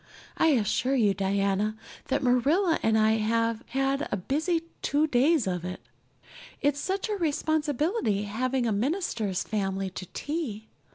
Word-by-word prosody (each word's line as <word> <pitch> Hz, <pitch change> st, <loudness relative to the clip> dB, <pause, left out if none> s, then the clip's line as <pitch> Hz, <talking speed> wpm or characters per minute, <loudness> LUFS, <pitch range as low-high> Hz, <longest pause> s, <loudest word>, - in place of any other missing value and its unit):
I -, -, +3 dB
assure 250 Hz, +3 st, +1 dB
you, 210 Hz, -6 st, +3 dB
Diana, 195 Hz, +2 st, 0 dB, 0.3 s
that 275 Hz, +1 st, 0 dB
Marilla 295 Hz, +9 st, +3 dB
and 220 Hz, 0 st, +3 dB
I 220 Hz, 0 st, +4 dB
have 230 Hz, +1 st, 0 dB
had 270 Hz, +3 st, 0 dB
a -, -, 0 dB
busy 315 Hz, -, 0 dB, 0.2 s
two 295 Hz, +2 st, +2 dB
days 290 Hz, 0 st, +3 dB
of 180 Hz, -2 st, -2 dB
it. 180 Hz, +1 st, -5 dB, 0.8 s
It's 285 Hz, 0 st, +1 dB
such 380 Hz, +6 st, -2 dB
a 430 Hz, -, -1 dB
responsibility 310 Hz, -, 0 dB
having 250 Hz, +5 st, -1 dB
a 225 Hz, -, +1 dB
minister's 220 Hz, -, -1 dB
family 195 Hz, -2 st, -2 dB
to 185 Hz, 0 st, -7 dB
tea. 260 Hz, -, -4 dB
245 Hz, 140 wpm, -27 LUFS, 205-295 Hz, 0.8 s, I